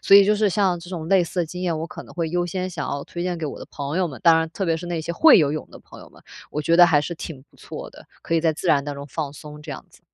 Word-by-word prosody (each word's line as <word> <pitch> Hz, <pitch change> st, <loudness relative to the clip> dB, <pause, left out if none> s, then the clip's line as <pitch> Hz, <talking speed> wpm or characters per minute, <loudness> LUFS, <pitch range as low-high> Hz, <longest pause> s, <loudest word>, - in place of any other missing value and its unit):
所 195 Hz, -, +7 dB
以， 200 Hz, -, +8 dB
就 210 Hz, +1 st, +3 dB
是， 210 Hz, 0 st, +2 dB
像 185 Hz, -3 st, +1 dB
这 175 Hz, -, -11 dB
种 170 Hz, -4 st, -5 dB
类 190 Hz, -2 st, +5 dB
似 175 Hz, +1 st, -2 dB
的 165 Hz, -, -1 dB
经 180 Hz, +3 st, -7 dB
验， 170 Hz, -3 st, -1 dB
我 165 Hz, -, -3 dB
可 -, -, -9 dB
能 -, -, -15 dB
会 165 Hz, -2 st, -2 dB
优 175 Hz, 0 st, 0 dB
先 185 Hz, +1 st, -3 dB
想 -, -, -4 dB
要 140 Hz, 0 st, -4 dB
推 175 Hz, -, -6 dB
荐 180 Hz, -1 st, -2 dB
给 165 Hz, -, -5 dB
我 145 Hz, -, -5 dB
的 -, -, -9 dB
朋 145 Hz, +4 st, -3 dB
友 180 Hz, -2 st, +1 dB
们， 135 Hz, -, -9 dB
当 165 Hz, -2 st, +7 dB
然， 160 Hz, 0 st, -1 dB
特 195 Hz, +3 st, -3 dB
别 165 Hz, -2 st, +1 dB
是 175 Hz, -, -7 dB
那 170 Hz, -1 st, -2 dB
些 170 Hz, +2 st, -3 dB
会 315 Hz, -, +7 dB
游 145 Hz, -3 st, +2 dB
泳 155 Hz, -, -5 dB
的 -, -, -12 dB
朋 -, -, -14 dB
友 -, -, -13 dB
们， -, -, -20 dB, 0.3 s
我 150 Hz, -, -3 dB
觉 170 Hz, +3 st, +3 dB
得 175 Hz, -, +10 dB
还 155 Hz, -3 st, +4 dB
是 170 Hz, -, -4 dB
挺 150 Hz, -4 st, -8 dB
不 -, -, -24 dB
错 -, -, -8 dB
的， -, -, -16 dB, 0.2 s
可 165 Hz, -, -2 dB
以 165 Hz, -, +3 dB
在 160 Hz, -2 st, +1 dB
自 175 Hz, -, -4 dB
然 140 Hz, -3 st, +4 dB
当 145 Hz, 0 st, -5 dB
中 140 Hz, 0 st, -8 dB
放 150 Hz, 0 st, -4 dB
松， 150 Hz, 0 st, -11 dB
这 -, -, -9 dB
样 -, -, -7 dB
子。 -, -, -21 dB
170 Hz, 375 characters per minute, -23 LUFS, 155-180 Hz, 0.3 s, 得